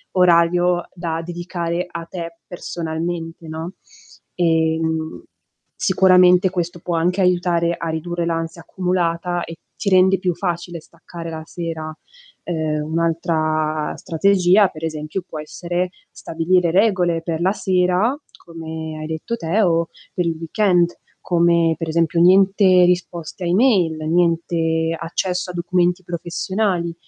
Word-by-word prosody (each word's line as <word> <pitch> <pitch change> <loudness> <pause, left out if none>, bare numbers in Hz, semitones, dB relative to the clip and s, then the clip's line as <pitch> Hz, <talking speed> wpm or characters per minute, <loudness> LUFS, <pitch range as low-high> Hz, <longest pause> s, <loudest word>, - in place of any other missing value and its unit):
orario 175 0 +3
da 165 -2 -3
dedicare 175 0 -3
a 170 -1 -6
te 170 -1 -7
personalmente, 165 -1 -5
no. 160 +3 -6 0.6
Ehm, 160 -1 0 0.5
sicuramente 185 -1 +5
questo 175 -1 -3
può 170 0 -3
anche 180 +4 +1
aiutare 175 -2 +2
a 165 - -4
ridurre 170 +2 -3
l'ansia 165 0 -3
accumulata, 175 -1 -1
e 165 - -7 0.2
ti 200 - -2
rende 190 0 +5
più 185 -2 0
facile 175 -1 -3
staccare 165 +1 -10
la 160 0 -6
sera. 160 -2 -5 0.5
Uhm, 155 -2 -2
un 165 - +1
altra 155 -2 0
strategia, 190 +3 +3
per 155 -2 -11
esempio 155 +3 -4
può 155 - -7
essere 175 +4 -3 0.2
stabilire 170 +2 0
regole 180 -4 +2
per 165 -1 -3
la 185 - +3
sera, 185 +4 +1 0.3
come 160 -1 -7
hai 155 - -5
detto 160 +9 -4
te 185 +1 0
o 170 -2 +2 0.3
per 180 - -1
il 165 - -1
weekend, 175 0 +1 0.2
come 170 -1 +3
per 165 - -4
esempio 165 +1 +1
niente 190 0 +5
risposte 175 0 -2
a - - -1
email, 185 -4 +3
niente 165 -1 +1
accesso 180 +2 -2
a - - -12
documenti 175 +1 0
professionali. 175 +1 -2
170 Hz, 130 wpm, -20 LUFS, 165-180 Hz, 0.6 s, sicuramente